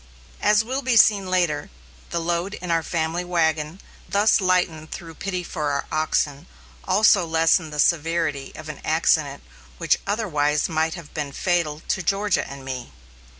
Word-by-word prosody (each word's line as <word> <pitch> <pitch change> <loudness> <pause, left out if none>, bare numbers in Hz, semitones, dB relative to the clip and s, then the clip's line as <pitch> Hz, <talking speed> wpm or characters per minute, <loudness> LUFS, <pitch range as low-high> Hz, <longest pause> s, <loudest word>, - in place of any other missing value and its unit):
As 210 +1 +4
will 260 +4 -3
be 255 -3 +2
seen 200 -4 +5
later, 175 -5 0 0.4
the 170 - -1
load 170 +4 -2
in 180 -2 -5
our 165 0 +2
family 165 +1 -2
wagon 160 -1 0 0.3
thus 210 +1 +3
lightened 180 -4 +1
through 165 -1 -8
pity 180 +1 -4
for 155 -4 -3
our 140 0 -1
oxen, 155 0 0 0.4
also 195 0 +4
lessened 165 0 +2
the 150 - -6
severity 160 -3 +1
of - - -9
an - - -8
accident - - +1 0.3
which - - +1
otherwise 150 -9 0
might 160 +1 0
have 170 -4 -11
been 145 -2 -3
fatal 160 -2 -1
to 190 - 0
Georgia 200 +2 0
and 140 -1 -9
me. 130 - -6
170 Hz, 155 wpm, -23 LUFS, 155-185 Hz, 0.4 s, seen